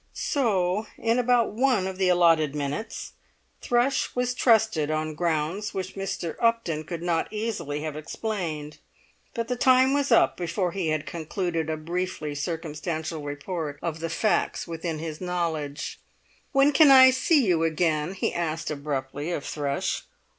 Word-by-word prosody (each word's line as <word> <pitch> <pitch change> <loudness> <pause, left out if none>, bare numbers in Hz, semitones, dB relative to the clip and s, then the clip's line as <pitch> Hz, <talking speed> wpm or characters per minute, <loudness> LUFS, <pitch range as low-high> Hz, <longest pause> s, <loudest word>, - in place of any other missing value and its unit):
So, 210 -6 0
in 230 +2 +1
about 245 -1 +3
one 235 -3 +2
of 190 0 -5
the 185 -1 +3
allotted 165 -4 +4
minutes, 145 +9 -4 0.5
Thrush 245 +3 +1
was 250 0 0
trusted 220 - +3
on 155 0 -1
grounds 170 +5 -1
which 190 -1 -4
Mr. 195 -4 -4
Upton 230 -10 +1
could 170 +1 -5
not 170 -2 0
easily 210 -10 -3
have 155 -2 -4
explained; 155 -3 -4 0.6
but 230 -1 -2
the 250 - -1
time 260 +2 +4
was 285 -2 0
up 230 - +4
before 175 +1 -1
he 185 -2 -2
had 155 -1 -1
concluded 165 -1 -3
a 160 - -1
briefly 170 -1 -3
circumstantial 160 +1 -4
report 145 +1 -4
of 165 -2 -3
the 165 +1 -3
facts 210 +4 0
within 165 -1 -4
his 155 0 -6
knowledge. 160 -5 -3 0.5
"When 275 +1 +4
can 300 0 +6
I 260 -1 +9
see 265 +1 +3
you 170 -4 +2
again?" 160 +1 0
he - - -1
asked 160 -2 -2
abruptly 145 0 -4
of 150 - -3
Thrush. 140 -2 -2
170 Hz, 150 wpm, -26 LUFS, 155-220 Hz, 0.6 s, I